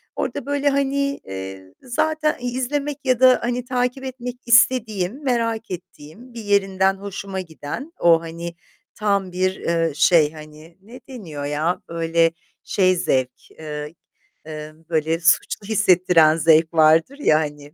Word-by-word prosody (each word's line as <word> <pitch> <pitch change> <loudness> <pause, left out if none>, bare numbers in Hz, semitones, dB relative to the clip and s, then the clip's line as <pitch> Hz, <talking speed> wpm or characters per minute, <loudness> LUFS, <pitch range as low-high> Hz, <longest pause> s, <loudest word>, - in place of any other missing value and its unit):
orada 285 -3 -3
böyle, 285 0 +1
hani, 280 0 0
eee, 95 0 -8
zaten 305 +5 -1
i 245 0 -3
izlemek 275 +3 -2
ya 255 -2 +2
da 255 -1 +6
hani, 245 +1 -2
takip 250 +1 -2
etmek 250 -2 -6
istediğim, 235 -1 +2
merak 230 -4 -1
ettiğim, 185 +6 -10
bir 230 -1 -8
yerinden 195 -2 +2
hoşuma 195 -1 -6
giden 170 - -8
o, 165 -1 +5
hani, 170 +1 -7 0.4
tam 200 -3 0
bir, 185 +1 0
eee, 165 -2 -1
şey, 155 -1 +4
hani, 155 +2 -13
ne 230 +6 -13
deniyor 165 - -7
ya, 155 +5 -1
böyle 165 0 +1 0.3
şey 185 -2 +2
zevk, 130 -7 -2
eee, 150 0 -7 0.5
eee, 155 -1 -8 0.2
böyle 160 0 0
suçlu 175 +3 +1
hissettiren 180 -6 +4
zevk 160 +1 +4
vardır 160 - +4
ya, 155 - +3
hani, 150 -1 -6
185 Hz, 140 wpm, -21 LUFS, 160-245 Hz, 0.5 s, da